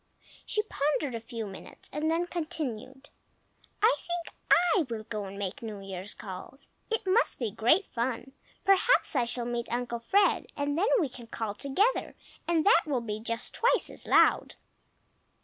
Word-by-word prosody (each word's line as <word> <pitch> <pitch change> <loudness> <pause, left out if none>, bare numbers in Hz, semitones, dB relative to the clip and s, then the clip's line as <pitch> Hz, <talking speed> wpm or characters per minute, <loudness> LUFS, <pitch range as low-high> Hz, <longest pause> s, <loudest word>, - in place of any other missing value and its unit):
She 425 - +1
pondered 295 - -1
a 230 - -3
few 230 -1 -5
minutes 195 -2 -11
and 300 +2 0
then 335 +2 +1
continued, 290 -6 -5 0.7
"I 455 +3 +6
think 345 -1 -5
I 350 +2 +5
will 225 -2 -4
go 215 -2 -4
and 195 +1 -8
make 195 -2 -4
New 215 -3 -6
Year's 195 +1 -6
calls. 200 +6 -8 0.2
It 450 -2 -1
must 405 +6 +2
be 230 -5 -2
great 245 - +3
fun! 240 +2 -3 0.3
Perhaps 390 -1 +4
I 250 -3 +3
shall 235 0 0
meet 240 -1 -3
Uncle 240 0 -2
Fred, 390 - +2
and 285 0 0
then 370 +7 +2
we 320 - +1
can 245 -2 -10
call 225 -2 -3
together, 325 - 0 0.3
and 335 -2 +2
that 400 -4 +6
will 270 -5 0
be 215 -2 -4
just 230 +1 -3
twice 480 - +2
as - - -7
loud." - - +4
260 Hz, 165 wpm, -29 LUFS, 225-340 Hz, 0.7 s, I